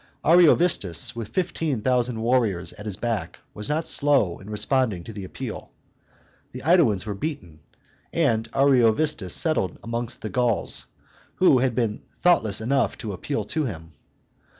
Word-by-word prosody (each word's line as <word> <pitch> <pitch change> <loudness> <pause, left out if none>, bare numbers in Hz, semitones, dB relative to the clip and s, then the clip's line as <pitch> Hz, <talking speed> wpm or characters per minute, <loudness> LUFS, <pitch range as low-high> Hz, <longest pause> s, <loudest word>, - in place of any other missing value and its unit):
Ariovistus, 155 - +3
with 115 -2 -5
fifteen 160 - -2
thousand 125 -2 +1
warriors 115 -7 0
at 105 0 -10
his 100 - -2
back, 115 -4 -3 0.2
was 105 0 -6
not 155 +2 0
slow 140 - +2
in 100 - -12
responding 105 -2 0
to 110 - -9
the 100 -1 -7
appeal. 95 - -7 0.8
The 125 - -7
AEdaans 135 - +3
were 105 - -3
beaten; 95 - -6 0.5
and 115 -9 0
Ariovistus 130 - +3
settled 155 - 0
amongst 120 +2 -4
the - - -3
Gauls 120 -5 0 0.5
who 160 -8 +4
had 125 -2 0
been 115 -3 -1 0.2
thoughtless 110 - +3
enough 135 +3 0
to 110 -8 -6
appeal 140 +10 -3
to 155 -2 -2
him. 80 -8 -7
120 Hz, 145 wpm, -24 LUFS, 105-140 Hz, 0.8 s, who